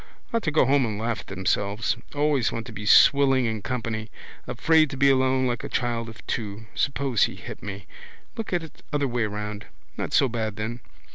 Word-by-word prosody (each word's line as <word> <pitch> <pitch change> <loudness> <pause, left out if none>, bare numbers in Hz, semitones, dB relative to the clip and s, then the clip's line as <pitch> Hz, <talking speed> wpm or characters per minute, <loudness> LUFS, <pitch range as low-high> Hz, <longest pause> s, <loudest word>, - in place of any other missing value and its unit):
Ought 230 - +2
to 155 - +1
go 150 - +4
home 135 +1 +3
and 110 -4 -2
laugh 115 +1 -2
at - - -11
themselves. 100 +4 0 0.2
Always 145 -4 +2
want 115 -1 -4
to 115 - -9
be 105 -1 -6
swilling 135 +1 +6
in 110 -2 -2
company. 115 -2 -3 0.4
Afraid 160 +4 +3
to 135 - -6
be 140 +1 +5
alone 130 0 +2
like 120 -2 -1
a - - -5
child 120 -2 -1
of 110 - -13
two. 105 -1 -4
Suppose 135 -4 +1
he - - -6
hit - - -9
me. 100 -2 -7 0.5
Look 225 - -5
at 175 -2 0
it 160 - -12
other 145 -2 +1
way 120 -2 0
round. 105 0 -5 0.3
Not - - -3
so 135 - +4
bad 110 -3 -3
then. 110 +3 -4
120 Hz, 205 wpm, -25 LUFS, 110-135 Hz, 0.5 s, swilling